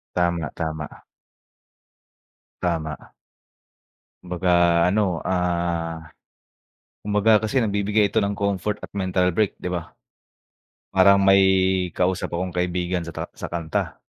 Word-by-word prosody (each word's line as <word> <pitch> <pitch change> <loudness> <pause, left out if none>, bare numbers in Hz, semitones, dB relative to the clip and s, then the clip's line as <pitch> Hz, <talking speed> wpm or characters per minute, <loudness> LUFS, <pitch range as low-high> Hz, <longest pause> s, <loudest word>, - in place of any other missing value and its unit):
Tama, 85 -3 0
tama. 80 -1 -5 1.6
Tama. 80 -4 -3 1.1
Kumbaga 90 0 -2 0.4
ano, 105 +4 +2 0.2
ah 85 -2 -1 1.0
kumbaga 105 +1 +1
kasi 110 +5 -2
nagbibigay 105 0 +1
ito - - +2
ng 100 0 -1
comfort 100 0 -1
at - - -10
mental 95 -2 0
break 105 +2 0
'di 90 - -5
ba? 85 -2 -5 1.0
Parang 100 +1 +6
may 95 0 +6 0.5
kausap 90 -1 -1
akong 90 +2 -2
kaibigan 90 0 -2
sa 85 - -8
ta - - -5
sa - - -5
kanta. 85 -2 -3
90 Hz, 110 wpm, -23 LUFS, 85-100 Hz, 1.6 s, Parang